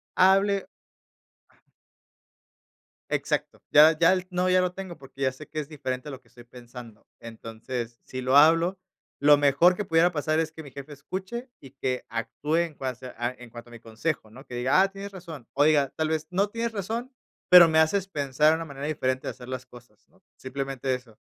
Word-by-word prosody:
hable 195 +1 +3 2.4
Exacto. - - -2
Ya 155 +1 +7
ya 170 +2 +6
el 185 -1 -2
no, 180 +1 0
ya 185 0 +4
lo 180 0 -1
tengo, 190 -3 -8
porque 135 0 -14
ya 130 -1 +2
sé 145 +4 -12
que 155 - -5
es 150 - -6
diferente 130 -3 -5
a - - -6
lo 130 - -9
que - - -29
estoy 120 0 -16
pensando. 120 -2 -13
Entonces, 115 +1 -7
si 130 0 -6
lo 130 +2 +1
hablo, 165 +5 +5 0.4
lo 145 +1 +6
mejor 145 +6 +4
que 210 - -4
pudiera 165 +2 +3
pasar 155 0 0
es 160 -1 -1
que 160 0 -10
mi 140 - -12
jefe 140 +2 -9
escuche 190 - -6
y 135 - -14
que 130 -2 -3
actúe 115 +8 -2
en 170 -2 0
cuasa 130 -2 -6
a 120 0 -1
en 120 -1 -12
cuanto 120 0 -11
a - - -17
mi 115 - -11
consejo, 115 +1 -4
¿no?, 135 +5 -13
que 125 - -9
diga: 130 +9 +3
"Ah, 195 - +3
tienes 200 +1 -8
razón". 165 -10 -10
O 140 - +3
diga: 145 -3 +3
"Tal 160 0 -1
vez 155 -1 -2
no 195 +3 +1
tienes 230 +1 -3
razón, 225 +6 -4 0.3
pero 180 -2 +9
me 160 - +2
haces 190 +5 +2
pensar 145 -2 +1
en 160 - +4
una 165 - -5
manera 140 -1 -6
diferente 130 -4 -2
de - - -1
hacer 125 - -12
las 130 0 -5
cosas", 120 -4 -17
¿no?, 190 0 -28
simplemente 135 0 -4
eso. 120 -4 -13
145 Hz, 205 wpm, -26 LUFS, 130-175 Hz, 2.4 s, pero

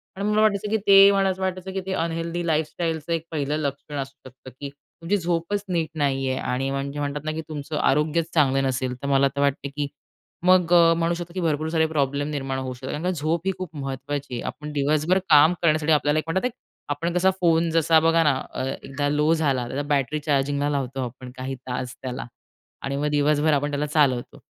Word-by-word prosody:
आणि 200 +1 -3
मला 210 0 +3
वाटायचं, 210 -1 +2
की 220 - +2
ते 195 0 +9
मला 195 -1 +2
असं 190 0 -3
वाटायचं, 185 0 -3
की 190 - -2
ते 190 - -2
अनहेल्दी 170 0 -2
लाईफस्टाईलचं 160 +1 -1
एक 165 -1 -2
1ल 150 -1 -1
लक्षण 145 0 -4
असू 135 +2 -9
शकतं, 130 +1 -13
की 140 -1 -5 0.3
तुमची 195 +5 +1
झोपच 175 +3 -1
नीट 165 -3 0
नाही 135 -3 0
आहे 130 - -1
आणि 135 +2 -1
म्हणजे 140 +1 -3
म्हणतात 145 0 -3
ना, 155 - -1
की 160 +1 -4
तुमचं 150 0 -5
आरोग्य 150 +4 +2
चांगलं 135 -4 +3
नसेल, 130 -1 -1
तर 140 - -4
मला 140 0 +4
तर 140 - 0
वाटतं, 140 0 0
की 145 -1 -1 0.6
मग 180 -2 +4
अ, 170 -1 +7
म्हणू 170 0 +1
शकतो, 170 0 -7
की 185 - -3
भरपूर 155 -1 0
सारे 160 -1 +2
प्रॉब्लेम 145 -2 -1
निर्माण 135 -3 -3
होऊ 130 -1 -4
शकतात 130 +1 -7
कारण 180 +2 0
झोप 160 +1 -1
ही 195 - +2
खूप 180 -4 -7
महत्त्वाची 140 0 -5
आहे. 120 - -3
आपण 150 0 -6
दिवसभर 155 +5 +2
काम 155 +2 +7
करण्यासाठी 155 -1 +2
आपल्याला 150 0 +2
एक 155 - -6
म्हणतात, 190 +8 0 0.4
आपण 165 +4 -2
कसा 180 +1 +3
फोन 165 -1 +3
जसा 165 0 +4
बघा 165 +1 +3
ना, 150 -3 +4 0.2
अ, 130 - -3 0.2
एकदा 145 +1 -2
लो 150 +2 +2
झाला, 140 -6 0
तर 140 +3 -2
बॅटरी 145 +1 0
चार्जिंगला 145 0 0
लावतो 135 -2 -2
आपण 125 +1 -9
काही 130 +1 -4
तास 125 -1 -5
त्याला 130 0 -5 0.6
आणि 135 0 -3
मग 145 +1 0
दिवसभर 150 +1 +2
आपण 145 +1 0
त्याला 145 +1 -1
चालवतो. 145 -5 +1
150 Hz, 210 wpm, -24 LUFS, 140-165 Hz, 0.6 s, ते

